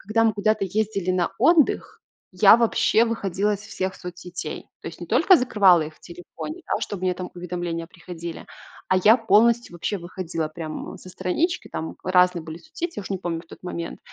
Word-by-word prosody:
Когда 225 +3 +1
мы 220 - +4
куда-то 215 0 +1
ездили 195 -1 -1
на 180 0 0
отдых, 305 +3 +3 0.3
я 200 +4 +7
вообще 230 -1 +3
выходила 205 -2 -1
из 200 - -8
всех 190 -2 -4
соцсетей. 180 0 -7 0.2
То - - -10
есть - - -12
не - - -6
только 380 - +5
закрывала 200 -9 +4
их 155 0 -7
в - - -29
телефоне, 175 - -9
да, - - -1
чтобы 195 -3 -5
мне 185 -1 +2
там 180 0 -6
уведомления 175 -1 -4
приходили, 170 -2 -8 0.4
а 185 - +3
я 215 +6 +6
полностью 235 0 +3
вообще 175 +4 -3
выходила 170 -2 -4
прям 155 0 -7
со - - -13
странички, 190 - -1
там 160 - -5
разные 180 -2 +3
были 160 +1 -8
соцсети, 325 - -6
я - - -4
уж 195 - -10
не 190 - -1
помню 170 -2 -3
тот - - -13
момент. 170 -2 -5
185 Hz, 185 wpm, -24 LUFS, 175-215 Hz, 0.4 s, я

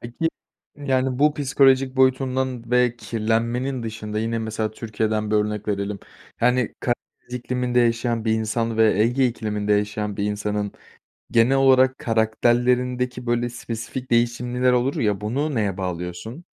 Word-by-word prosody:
Peki, 120 +8 -2 0.5
yani 130 -3 0
bu 150 +1 +4
psikolojik 135 -2 +3
boyutundan 130 -2 +1
ve 125 -1 +3
kirlenmenin 115 +3 -1
dışında, 110 -1 -5
yine, 115 +1 -1
mesela 110 -1 -2
Türkiye'den 110 -1 -2
bir 105 - +3
örnek 105 0 -1
verelim, 100 0 -2 0.4
yani, 125 0 +2
Karadeniz 120 0 -5
ikliminde 125 0 0
yaşayan 115 -1 +1
bir 110 - +2
insan 110 +1 -1
ve 110 -2 +4
Ege 125 +4 +2
ikliminde 105 -3 -2
yaşayan 105 0 -1
bir 100 - -1
insanın 105 0 -2 0.6
genel 120 +3 +4
olarak 130 -1 +4
karakterlerindeki, 125 +2 +1
böyle, 120 0 +1
spesifik 120 +2 -6
değişimler 120 +1 +1
olur 125 +2 +1
ya, 105 -3 0
bunu 135 +8 -1
neye 105 -5 0
bağlıyorsun? 90 - -5
120 Hz, 135 wpm, -23 LUFS, 110-125 Hz, 0.6 s, bu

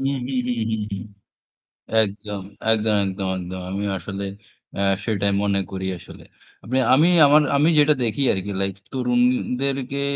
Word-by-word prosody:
হুম, 135 +1 0
হুম, 130 -2 -1
হুম, 120 -2 -1
হুম, 110 -1 -1
হুম। 100 - -4 1.0
একদম, 105 -1 -3 0.3
একদম, 110 -1 +2
একদম, 95 0 -3
একদম। 90 0 -6
আমিও 100 +1 -2
আসলে 100 +3 -5 0.5
আ - - -1 0.2
সেটাই 100 -3 0
মনে 100 -1 +1
করি 95 0 -4
আসলে। - - -13 0.7
আমি 150 +6 +5 0.2
আমার 150 +2 +6 0.2
আমি 150 +3 +4
যেটা 150 +1 +5
দেখি 115 +3 -1
আরকি 95 +1 -4
লাইক 95 -1 -1 0.2
তরুণদেরকে 125 +2 0
110 Hz, 140 wpm, -22 LUFS, 100-130 Hz, 1.0 s, আমার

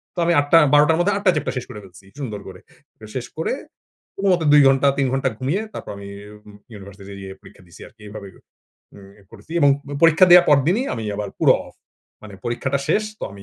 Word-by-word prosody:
তো - - -5
আমি 170 - +2
৮ 145 - 0
টা 165 - +7 0.2
১২ 145 0 +6
টার 160 - +3
মধ্যে 200 +3 +1
৮ 205 - -7
টা 185 - +6
চ্যাপ্ট 150 - -3
টা - - -3
শেষ 125 - -5
করে 105 -4 -9
ফেলছি 95 0 -17
সুন্দর 110 -7 -5
করে। - - -11 0.4
তো 110 - -12
শেষ 125 - -4
করে 160 - -2 0.6
কোনমতে 185 -5 0
২ 150 - +7
ঘন্টা 135 +1 +3
৩ 135 -2 +1
ঘণ্টা 135 0 0
ঘুমিয়ে 145 +11 -2
তারপর - - -8
আমি 100 0 -10 0.4
উম 105 - -15 0.2
ইউনিভার্সিটি 100 0 -12
যেয়ে 95 0 -8
পরীক্ষা 95 +1 -17
দিছি 85 - -16
আরকি। 115 - -22
এভাবে 105 -1 -9 0.7
উম 100 -1 -15 0.2
করেছি 115 +8 -14
এবং 145 - +5 0.2
উম 145 - -5
পরীক্ষা 165 +3 +6
দেওয়ার 175 0 +8
পরদিনই 165 - +2
আমি 115 -2 -6
আবার 105 -1 -5
পুরো - - +5
অফ - - -16 0.5
মানে 105 -2 -11
পরীক্ষাটা 130 +3 -2
শেষ 215 - +2 0.2
তো - - -5
আমি 100 0 -13
130 Hz, 225 wpm, -20 LUFS, 100-160 Hz, 0.7 s, দেওয়ার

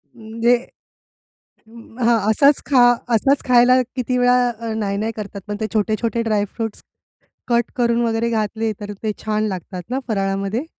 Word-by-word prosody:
म्हणजे 230 +1 +1 1.1
अं, 230 0 -15
हां, 235 0 +4
असाच 280 +5 +4
खा 270 -3 +3 0.4
असाच 270 +5 +2
खायला 250 +1 +5
किती 250 -1 -1
वेळा 245 0 +4 0.2
अ, 230 -1 -4
नाही-नाही 210 +1 -2
करतात 200 -2 -7
पण 205 0 -4
ते 220 - -2
छोटे-छोटे 220 +2 0
ड्राय 215 -2 0
फ्रुट्स 225 -2 -5 0.6
कट 235 -1 +1
करून 235 -1 +1
वगैरे 230 0 0
घातले 220 0 -1
तर 205 -1 -6
ते 215 - 0
छान 215 0 -1
लागतात 185 -1 -6
ना 255 +2 -1
फराळामध्ये. 195 +3 -1
225 Hz, 150 wpm, -20 LUFS, 210-240 Hz, 1.1 s, खायला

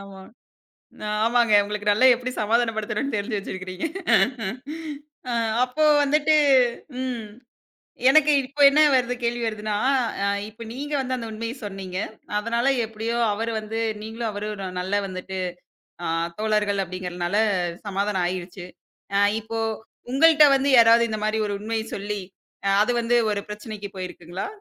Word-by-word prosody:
ஆமா. 195 -1 -11 1.1
ஆமாங்க. 235 -2 +3
உங்களுக்கு 210 0 -2
நல்லா 215 +5 +4
எப்டி 250 +1 -4
சமாதானப்படுத்தணும்னு 225 +3 0
தெரிஞ்சு 205 +1 -2
வெச்சிருக்கீங்க. 185 - -5 1.4
ஆ, - - -1 0.3
அப்போ 255 +5 -1 0.2
வந்துட்டு 300 +2 +3 0.7
ம் 245 -4 -3 0.9
எனக்கு 300 0 +5
இப்ப 280 +3 -9
என்ன 305 +2 +4
வருது 250 -1 +2
கேள்வி 235 0 -1
வருதுன்னா, 215 -1 -2 0.5
அ - - +1 0.2
இப்ப 225 +2 -10
நீங்க 290 +4 -6
வந்து 260 -1 -2
அந்த 230 -2 -6
உண்மைய 230 +2 -4
சொன்னீங்க. 190 -2 -6 0.4
அதனால 235 +3 -1 0.2
எப்டியோ 225 +1 -4 0.2
அவரு 225 +2 -2
வந்து 215 +1 -5 0.2
நீங்களும், 225 +1 -4
அவரும் 210 +1 -4
ஒரு 195 - -5
நல்லா 190 +3 0
வந்துட்டு, 190 0 -6 0.7
அ - - -1 0.3
தோழர்கள் 210 -2 +1
அப்டிங்கிறதுனால 180 +1 -3 0.5
சமாதானம் 195 -2 0
ஆயிருச்சு. 180 0 -6 0.5
அ, - - +4 0.2
இப்போ 225 +1 -5 0.5
உங்கள்ட்ட 310 +3 +6
வந்து 270 +1 +1
யாராவது 230 0 +6
இந்த 215 - -3
மாரி 215 +1 0
ஒரு 205 - -2
உண்மைய 220 +1 -3
சொல்லி, 205 0 -4 0.5
அ - - +3
அது 245 - 0
வந்து 240 +1 +2
ஒரு 200 -1 -2
பிரச்சனைக்கு 210 -1 -7
போயிருக்குங்களா? 180 - -6
215 Hz, 135 wpm, -24 LUFS, 200-240 Hz, 1.4 s, உங்கள்ட்ட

